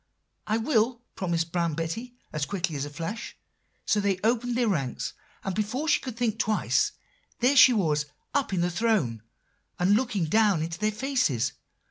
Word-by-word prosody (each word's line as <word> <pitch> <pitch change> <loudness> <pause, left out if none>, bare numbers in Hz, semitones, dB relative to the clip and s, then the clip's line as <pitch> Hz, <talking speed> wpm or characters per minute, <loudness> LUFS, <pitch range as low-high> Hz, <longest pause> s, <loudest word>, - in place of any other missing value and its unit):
"'I 215 - +2
will,' 235 0 +1
promised 170 -3 -1
Brown 170 -3 0
Betty 195 +10 -4 0.2
as 150 -1 -1
quick 180 -4 -2
as 145 -2 -3
a - - -6
flash. 165 +9 -6 0.5
So 210 - +2
they 200 -2 +1
opened 240 +2 +1
their 245 -2 +2
ranks; 140 - -1 0.3
and 195 - -2
before 220 - -2
she - - +4
could 255 -4 -7
think 230 -2 0
twice, 215 -1 +1 0.4
there 255 +4 +3
she 260 -1 +9
was 155 -9 +1 0.3
up 280 -5 +1
in 185 -3 0
the 175 0 +1
throne, 170 - +1 0.6
and 180 +3 +3
looking 220 -7 0
down 200 -1 +3
into 165 +1 -5
their 215 0 +1
faces. 240 - 0
205 Hz, 170 wpm, -27 LUFS, 165-235 Hz, 0.6 s, she